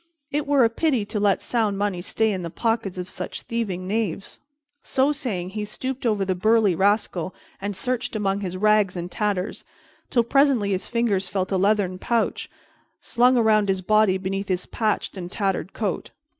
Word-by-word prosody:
It 295 Hz, 0 st, -1 dB
were 280 Hz, -3 st, +4 dB
a 230 Hz, -, +5 dB
pity 260 Hz, -4 st, +1 dB
to 210 Hz, -, -3 dB
let 200 Hz, -2 st, +2 dB
sound 220 Hz, -4 st, 0 dB
money 200 Hz, -3 st, -1 dB
stay 220 Hz, +4 st, +1 dB
in 190 Hz, -2 st, -2 dB
the 170 Hz, -, -4 dB
pockets 225 Hz, -1 st, -1 dB
of 180 Hz, 0 st, -4 dB
such 180 Hz, 0 st, -6 dB
thieving 200 Hz, -6 st, -3 dB
knaves." 205 Hz, -3 st, -2 dB, 0.4 s
So 270 Hz, +2 st, +2 dB
saying, 220 Hz, -, -3 dB
he 210 Hz, +1 st, -3 dB
stooped 255 Hz, +4 st, -3 dB
over 205 Hz, -3 st, +1 dB
the 190 Hz, -, +1 dB
burly 215 Hz, +1 st, +3 dB
rascal 195 Hz, -1 st, +1 dB, 0.3 s
and 200 Hz, 0 st, -3 dB
searched 250 Hz, +4 st, -2 dB
among 200 Hz, -2 st, 0 dB
his 185 Hz, -2 st, -4 dB
rags 210 Hz, -2 st, +3 dB
and 175 Hz, +1 st, -5 dB
tatters, 200 Hz, 0 st, -2 dB, 0.5 s
till 235 Hz, -, +3 dB
presently 260 Hz, -4 st, +3 dB
his 190 Hz, -1 st, -1 dB
fingers 210 Hz, -6 st, 0 dB
felt 190 Hz, 0 st, -2 dB
a 190 Hz, -, +2 dB
leathern 195 Hz, -2 st, +1 dB
pouch 235 Hz, +1 st, -1 dB, 0.5 s
slung 250 Hz, +1 st, +3 dB
around 215 Hz, -3 st, +3 dB
his 190 Hz, -1 st, 0 dB
body 215 Hz, -1 st, +4 dB
beneath 195 Hz, +1 st, -3 dB
his 185 Hz, -1 st, -1 dB
patched 215 Hz, -2 st, -1 dB
and 180 Hz, -1 st, -6 dB
tattered 195 Hz, -2 st, -1 dB
coat. 205 Hz, -5 st, -3 dB
205 Hz, 180 wpm, -24 LUFS, 190-230 Hz, 0.5 s, a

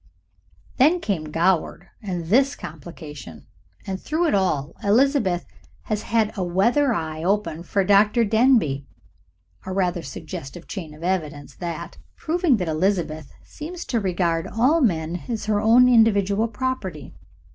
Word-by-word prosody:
Then 315 Hz, +7 st, +4 dB
came 195 Hz, -, -2 dB
Goward 165 Hz, +3 st, 0 dB
and 180 Hz, -5 st, -4 dB
this 270 Hz, -, +3 dB
complication, 150 Hz, -, -10 dB, 0.4 s
and 190 Hz, -1 st, -4 dB
through 320 Hz, +3 st, 0 dB
it 320 Hz, -, +1 dB
all 165 Hz, -7 st, 0 dB
Elizabeth 210 Hz, -5 st, +2 dB, 0.4 s
has 215 Hz, -1 st, -2 dB
had 220 Hz, -1 st, 0 dB
a 195 Hz, -, -2 dB
weather 235 Hz, +11 st, +2 dB
eye 160 Hz, -5 st, -3 dB
open 195 Hz, -3 st, 0 dB
for 195 Hz, +3 st, 0 dB
Dr. 210 Hz, +4 st, +4 dB
Denbigh. 220 Hz, -, +3 dB, 0.8 s
A -, -, -3 dB
rather 180 Hz, -2 st, 0 dB
suggestive 165 Hz, +3 st, -8 dB
chain 165 Hz, -7 st, -7 dB
of 155 Hz, -, -13 dB
evidence 155 Hz, -6 st, -3 dB
that, 170 Hz, -1 st, -6 dB, 0.2 s
proving 330 Hz, -5 st, +1 dB
that 180 Hz, -4 st, -3 dB
Elizabeth 155 Hz, -3 st, -1 dB
seems 340 Hz, +4 st, -8 dB
to 235 Hz, -, 0 dB
regard 175 Hz, -4 st, 0 dB
all 265 Hz, +9 st, +2 dB
men 170 Hz, -, 0 dB
as 225 Hz, -3 st, -3 dB
her 210 Hz, -1 st, +1 dB
own 235 Hz, +3 st, +6 dB
individual 220 Hz, -3 st, +3 dB
property. 225 Hz, -, -4 dB
190 Hz, 135 wpm, -23 LUFS, 165-230 Hz, 0.8 s, own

